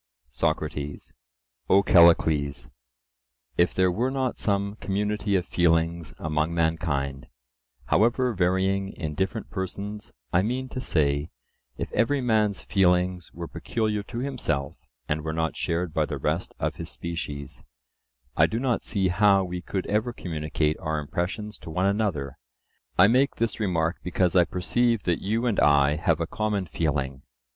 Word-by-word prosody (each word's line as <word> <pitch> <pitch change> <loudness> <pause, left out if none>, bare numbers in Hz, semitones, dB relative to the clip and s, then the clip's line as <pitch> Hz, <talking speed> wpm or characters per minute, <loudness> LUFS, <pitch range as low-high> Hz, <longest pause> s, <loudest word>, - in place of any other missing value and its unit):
SOCRATES: 70 +3 -2 0.6
O 100 +1 +6
Callicles, 80 -6 +4 0.8
if 85 - +3
there 95 -1 +3
were 120 +8 0
not 130 -2 -2
some 100 0 0
community 105 +1 -1
of 90 -2 +1
feelings 85 -1 +1
among 80 +2 -1
mankind, 75 -5 -1 0.6
however 120 +3 +2
varying 95 +1 +1
in 80 -3 -4
different 95 +7 -3
persons—I 95 -6 -3
mean 125 +5 -2
to 130 - -5
say, 70 - +1 0.5
if - - -4
every 140 +5 +2
man's 110 -5 +1
feelings 90 -2 +1
were 85 0 -7
peculiar 110 +1 -2
to 115 +4 -8
himself 120 - -2 0.3
and 75 0 -1
were 80 0 -3
not 80 -1 -1
shared 85 -1 -2
by 80 -2 +1
the 75 - -3
rest 75 +6 -2
of - - -2
his - - -6
species—I 65 -5 -4
do 115 - -2
not 125 -2 0
see 95 -3 0
how 100 +1 +4
we 90 -1 -4
could 95 +1 -3
ever 110 +4 0
communicate 75 -4 -2
our 80 -1 -2
impressions 95 +8 -3
to - - -10
one 90 +4 0
another. 95 -10 -1 0.6
I 90 - +8
make 130 +5 +3
this 115 0 -1
remark 85 -4 0
because 90 0 0
I 90 -2 +6
perceive 115 +6 0
that 85 -2 0
you 115 +5 0
and 115 -5 +1
I 75 0 +4
have 80 -1 +1
a 85 - 0
common 105 +1 -1
feeling. 70 -6 -2
90 Hz, 145 wpm, -26 LUFS, 80-105 Hz, 0.8 s, I